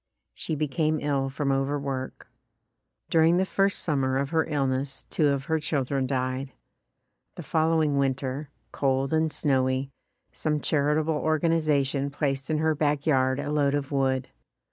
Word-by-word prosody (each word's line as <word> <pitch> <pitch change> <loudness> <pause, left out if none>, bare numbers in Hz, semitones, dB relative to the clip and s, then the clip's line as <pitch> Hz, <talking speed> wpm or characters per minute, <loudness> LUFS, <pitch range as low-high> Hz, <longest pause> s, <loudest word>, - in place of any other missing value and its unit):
She 160 - -3
became 155 +1 0
ill 140 -2 0
from 140 0 -1
overwork. 135 -1 -2 0.8
During 165 +1 +5
the 190 - +2
first 195 +1 0
summer 135 -4 +1
of 140 0 -2
her 160 -1 +1
illness 135 -2 -1
two 155 - +2
of 140 -1 0
her 160 +4 0
children 140 -3 -1
died. 130 0 -2 0.8
The 175 - -7
following 160 -3 +2
winter, 135 +1 -1 0.2
cold 135 +1 0
and 160 0 +2
snowy, 130 -2 0 0.4
some 150 -1 -1
charitable 150 +2 +1
organization 150 -3 +1
placed 140 -2 -2
in 155 - +1
her 160 +1 +2
back 145 -1 0
yard 130 -3 +2
a 145 - -3
load 145 -1 +2
of 145 -1 -3
wood. 135 -2 0
140 Hz, 145 wpm, -26 LUFS, 135-155 Hz, 0.8 s, During